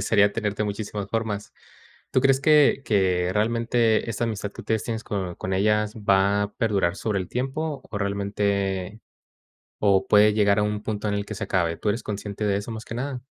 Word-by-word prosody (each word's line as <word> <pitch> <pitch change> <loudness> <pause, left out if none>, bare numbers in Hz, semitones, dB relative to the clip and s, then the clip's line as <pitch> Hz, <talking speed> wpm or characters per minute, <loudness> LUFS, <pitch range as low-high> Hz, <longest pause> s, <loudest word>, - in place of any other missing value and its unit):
desearía 100 0 +3
tener 105 -2 -2
de 105 - 0
muchísimas 105 -1 -4
formas. 110 -2 -3 0.6
¿Tú - - +4
crees 135 0 +3
que 150 -2 +5
que 90 -4 +2
realmente 115 +1 +1
esta 115 +2 -1
amistad 105 -3 -3
que - - -9
ustedes 110 -1 -1
tienes 110 -1 -4
con 95 -4 -3
con 95 - -4
ellas 105 +2 +1
va 100 -1 +2
a 100 0 -4
perdurar 100 -5 0
sobre 105 -2 -1
el 90 - -5
tiempo? 135 +3 -3
¿O 105 - -4
realmente? 100 0 -1 0.9
o, 95 -1 +4
¿puede 105 0 +6
llegar 105 -1 +3
a - - +2
un 105 0 -2
punto 105 -1 -3
en - - -1
el 100 0 -2
que 110 - -6
se 100 - -4
acabe? 85 -4 0
¿Tú 105 - -1
eres 115 +4 -1
consciente 105 0 -4
de 100 -1 +2
eso 100 +3 -5
más 110 0 -7
que 115 - -7
nada? 130 0 -4
105 Hz, 200 wpm, -24 LUFS, 100-115 Hz, 0.9 s, puede